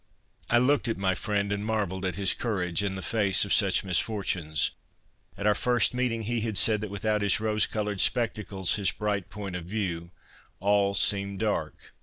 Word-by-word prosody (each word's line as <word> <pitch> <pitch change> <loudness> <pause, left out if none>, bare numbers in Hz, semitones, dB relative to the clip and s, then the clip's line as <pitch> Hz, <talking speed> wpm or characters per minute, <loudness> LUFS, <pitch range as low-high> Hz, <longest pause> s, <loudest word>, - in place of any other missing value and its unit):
I 120 - +4
looked 130 +2 +3
at 115 - -1
my 95 -1 +1
friend 100 +1 -1
and 100 0 -2
marvelled 100 -4 -2
at 90 -3 -1
his 100 -1 +2
courage 95 -6 -1
in 100 -1 -2
the 95 - -6
face 100 0 +2
of 100 - 0
such 100 -2 +3
misfortunes. 90 - 0 0.7
At 100 - -5
our 105 - +5
first 120 +3 +2
meeting 125 -2 -1
he 115 +1 -1
had 110 -2 -2
said 105 +1 +2
that 105 - -4
without 105 +1 -1
his 100 -1 +2
rose 110 -1 +2
coloured 105 -2 -2
spectacles, 105 -6 0
his 100 -2 +2
bright 100 -3 -2
point 100 -3 -6
of 85 -2 -5
view, 90 -4 -3 0.5
all 100 0 +2
seemed 100 -1 +2
dark. 105 0 -3
100 Hz, 185 wpm, -27 LUFS, 95-110 Hz, 0.7 s, our